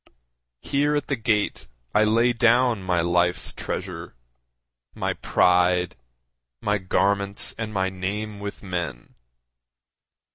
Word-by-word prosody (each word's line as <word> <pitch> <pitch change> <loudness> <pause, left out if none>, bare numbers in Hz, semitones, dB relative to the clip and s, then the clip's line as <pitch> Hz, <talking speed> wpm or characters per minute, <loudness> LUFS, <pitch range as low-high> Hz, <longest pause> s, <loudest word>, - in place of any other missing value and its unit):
Here 145 +2 +1
at 145 - -2
the 140 - +1
gate 110 -3 0 0.3
I 110 - +4
lay 115 +3 +3
down 120 -1 +3
my 90 -2 +1
life's 85 +1 +1
treasure, 90 -5 -5 0.8
My - - -1
pride, 90 0 +2 0.6
my 105 0 0
garments 100 +1 0
and 115 -2 -4
my 95 -2 0
name 100 +3 -4
with 100 0 -7
men. 85 -10 -4
100 Hz, 110 wpm, -24 LUFS, 90-110 Hz, 0.8 s, I